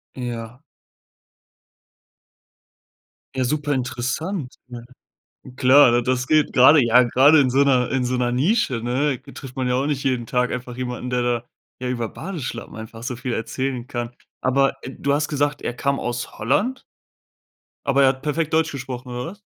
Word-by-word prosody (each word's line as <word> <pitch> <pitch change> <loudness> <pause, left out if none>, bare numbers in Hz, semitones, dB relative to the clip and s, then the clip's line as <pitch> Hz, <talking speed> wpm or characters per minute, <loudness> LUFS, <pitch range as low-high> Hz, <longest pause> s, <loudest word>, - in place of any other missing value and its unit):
Ja. 120 -1 -6 2.7
Ja, 130 - 0
super 145 +3 0
interessant, 130 +5 -3
ne? 120 -1 -9 0.7
Klar, 130 -1 +6
d 120 - +3
das 130 +1 0
geht 155 0 +3
gerade 130 +2 +7
ja, 120 +2 +6
gerade 140 +6 +5
in 130 - +2
so 130 - +1
'ner 130 -3 +2
in 130 -1 0
so 125 +1 -1
'ner 120 -1 0
Nische 135 - +1
ne, 130 +3 0
g - - -15
trifft 130 -2 -10
man 130 -1 -1
ja 125 - +1
auch 135 - 0
nicht 145 -3 -1
jeden 125 -3 0
Tag 125 -1 0
einfach 125 -1 -5
jemanden, 125 0 -4
der 125 -1 0
da 120 -1 -1 0.4
ja 125 - -3
über 120 -2 -2
Badeschlappen 140 - -6
einfach 110 +1 -9
so 125 - -3
viel 125 0 -4
erzählen 125 +2 -3
kann. 120 -1 -4 0.3
Aber, 135 +2 +2
äh, 130 - -6
du 140 - 0
hast 145 +1 0
gesagt, 145 0 -1
er 120 - -3
kam 140 +2 -1
aus 120 0 -4
Holland 240 - 0 1.0
Aber 140 0 +3
er - - +6
hat 130 0 -3
perfekt 155 +2 -2
Deutsch 160 0 +2
gesprochen 125 -2 -6
oder 125 0 -4
was? 205 - -15
130 Hz, 175 wpm, -22 LUFS, 120-140 Hz, 2.7 s, gerade